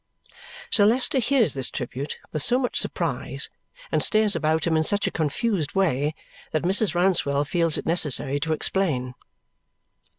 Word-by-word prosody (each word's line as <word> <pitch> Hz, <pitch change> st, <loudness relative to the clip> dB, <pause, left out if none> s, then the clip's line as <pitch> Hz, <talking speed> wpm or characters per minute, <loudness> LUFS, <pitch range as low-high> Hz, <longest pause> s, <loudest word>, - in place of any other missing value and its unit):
Sir 205 Hz, -1 st, +5 dB
Leicester 255 Hz, +4 st, +2 dB
hears 245 Hz, -, +2 dB
this 135 Hz, -2 st, -2 dB
tribute 130 Hz, +3 st, -5 dB
with 155 Hz, -, -3 dB
so 245 Hz, -, +4 dB
much 255 Hz, -2 st, -1 dB
surprise -, -, -2 dB, 0.4 s
and -, -, +1 dB
stares 215 Hz, -2 st, +2 dB
about 155 Hz, +1 st, 0 dB
him 165 Hz, -1 st, +1 dB
in 160 Hz, -, +2 dB
such 205 Hz, +5 st, 0 dB
a -, -, -1 dB
confused 165 Hz, +1 st, -1 dB
way 155 Hz, -5 st, +1 dB, 0.4 s
that 155 Hz, -, 0 dB
Mrs. 190 Hz, +2 st, +2 dB
Rouncewell 165 Hz, -6 st, +1 dB
feels 165 Hz, +1 st, 0 dB
it -, -, -5 dB
necessary 145 Hz, -4 st, +2 dB
to 160 Hz, +3 st, -2 dB
explain. 150 Hz, -7 st, 0 dB
165 Hz, 155 wpm, -24 LUFS, 145-205 Hz, 0.4 s, Sir